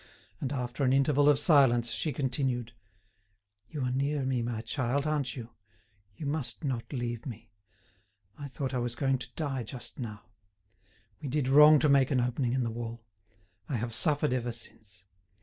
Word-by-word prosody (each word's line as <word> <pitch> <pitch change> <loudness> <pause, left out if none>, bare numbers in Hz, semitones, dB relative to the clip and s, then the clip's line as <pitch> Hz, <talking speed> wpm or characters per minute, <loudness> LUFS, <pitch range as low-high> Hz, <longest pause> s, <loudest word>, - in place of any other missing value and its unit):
And 135 - -3
after 125 0 -3
an 130 -1 +3
interval 145 +1 +4
of 145 - +5
silence, 120 -7 +4
she 155 - -1
continued: 125 -3 -2 1.0
"You 150 -4 -4
are 125 - 0
near 140 +2 0
me, 130 -2 0
my 115 -1 -3
child, 130 +3 -1
aren't 150 -4 -1
you? 120 -3 -8 0.6
You 150 - -7
must 145 +1 -3
not 130 -5 -3
leave 120 -2 -4
me. 115 -2 -9 0.8
I 145 - -7
thought 135 0 -4
I 125 - 0
was 120 0 -3
going 135 -1 +1
to - - -8
die 140 -5 -2
just 120 +4 -8
now. 105 -4 -6 1.0
We 145 - -4
did 140 -1 0
wrong 150 +3 +8
to 150 - +2
make 140 -2 +4
an 130 - +2
opening 125 0 0
in 130 -1 +1
the 115 - -2
wall. 115 0 -6 0.6
I 140 - -1
have 115 0 -3
suffered 150 0 +2
ever 120 -1 -1
since. 105 -5 -11
130 Hz, 175 wpm, -30 LUFS, 120-140 Hz, 1.0 s, wrong